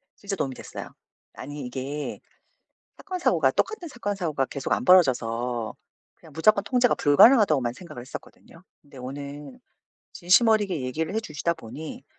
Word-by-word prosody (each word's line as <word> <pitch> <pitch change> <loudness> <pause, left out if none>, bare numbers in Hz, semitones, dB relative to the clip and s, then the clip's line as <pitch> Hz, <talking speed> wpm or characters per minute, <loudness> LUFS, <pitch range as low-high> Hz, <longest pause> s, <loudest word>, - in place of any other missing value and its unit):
진짜 200 -1 -5
도움이 135 -7 -3
됐어요. - - -8 0.4
아니 145 -2 -7
이게 135 +4 -5 0.8
사건 370 -2 -6
사고가 160 - +3
똑같은 370 - -2
사건 220 -7 -4
사고가 155 -8 -1
계속 140 0 -6
안 - - -1
벌어져서 120 -9 +2 0.4
그냥 160 - -17
무조건 200 +6 +3
통제가 245 +2 +2
불가능하다고만 145 - +5
생각을 150 -4 -10
했었거든요. 155 +6 -12 0.2
근데 140 -2 -17
오늘 140 - -8 0.5
진심어리게 200 - +3
얘기를 155 +8 -3
해 - - +2
주시다 170 -4 -2
보니 160 - -9
155 Hz, 360 characters per minute, -25 LUFS, 135-205 Hz, 0.8 s, 불가능하다고만